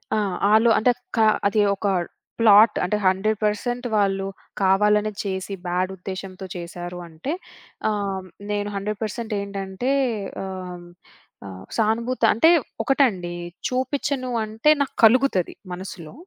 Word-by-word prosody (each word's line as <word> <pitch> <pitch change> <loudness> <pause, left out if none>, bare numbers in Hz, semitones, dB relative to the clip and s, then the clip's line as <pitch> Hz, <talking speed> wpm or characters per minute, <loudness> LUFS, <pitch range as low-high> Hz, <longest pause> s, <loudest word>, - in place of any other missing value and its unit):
ఆ! - - +1 0.3
ఆళ్ళు 225 +2 +5
అంటే 245 +3 +4 0.3
క - - +3 0.3
అది 210 +1 +2
ఒక 200 - -3 0.5
ప్లాట్ 215 0 +7
అంటే 210 +3 0
100% 215 +5 0
వాళ్ళు 195 -1 +1 0.3
కావాలనే 210 +2 +3
చేసి, 190 0 -4
బ్యాడ్ 180 +1 0
ఉద్దేశ్యంతో 190 0 -7
చేసారు 175 +1 -6
అంటే, 165 - -6 0.6
ఆహ్, 195 -3 -2 0.3
నేను 205 0 -1
100 210 +1 -3
పర్సెంటేంటంటే, 200 +1 -3 0.5
ఆహ్, 180 -2 -7 0.6
ఆహ్, 95 0 -9
సానుభూతి 230 +2 +1
అంటే 320 +10 +5 0.3
ఒకటండీ 195 -11 +1 0.3
చూపిచ్చను 260 0 -1
అంటే, 220 +8 +2
నాకు 275 - -2
కలుగుతది 240 -6 +3 0.2
మనసులో. 180 -3 -8
205 Hz, 110 wpm, -23 LUFS, 190-225 Hz, 0.6 s, ప్లాట్